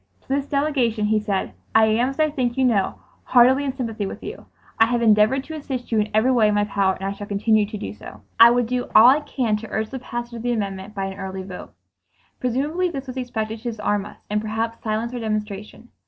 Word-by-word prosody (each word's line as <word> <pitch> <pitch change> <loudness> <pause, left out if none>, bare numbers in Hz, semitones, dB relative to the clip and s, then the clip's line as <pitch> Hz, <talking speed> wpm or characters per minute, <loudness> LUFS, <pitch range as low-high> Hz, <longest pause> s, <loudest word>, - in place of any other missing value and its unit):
To - - -32
this 275 +1 0
delegation 265 -7 0
he 215 0 +2
said, 200 -2 -2 0.2
"I 220 0 +7
am, 225 +4 +2
as 270 - -8
I 310 -1 +3
think 250 -4 -1
you 265 - +3
know, 205 -6 +1 0.3
heartily 255 +3 +5
in 275 - -1
sympathy 225 -6 -3
with - - -8
you. - - -8 0.3
I 225 - +6
have 240 0 0
endeavored 215 +4 +4
to 315 - -9
assist 265 -6 -5
you 220 - +3
in 210 0 0
every 220 +5 +3
way 235 -4 +4
in 210 - +1
my 205 - +3
power, 200 -2 +1
and 190 - -10
I 195 - -1
shall 205 0 -7
continue 210 +1 +2
to 215 - -6
do 100 - -6
so. 105 0 -12 0.2
I 230 - +10
will 245 +1 +2
do 250 +1 -2
all 220 - +9
I 280 +3 +5
can 255 -7 -1
to 225 +1 -9
urge 220 0 -2
the 265 - -5
passage 240 -1 -6
of 230 - -6
the 245 +1 0
amendment 200 -1 -4
by 195 -1 -2
an 195 +1 -6
early 190 -1 -5
vote." 185 -1 -10 0.6
Presumably 290 +9 0
this 275 -5 -6
was 255 -1 -7
expected 225 -3 -3
to - - -22
disarm 205 -2 -1
us - - -13
and 210 0 -1
perhaps 225 +1 -3
silence 225 +2 -2
our 245 - -3
demonstration. 215 +1 -5
225 Hz, 245 wpm, -22 LUFS, 210-250 Hz, 0.6 s, I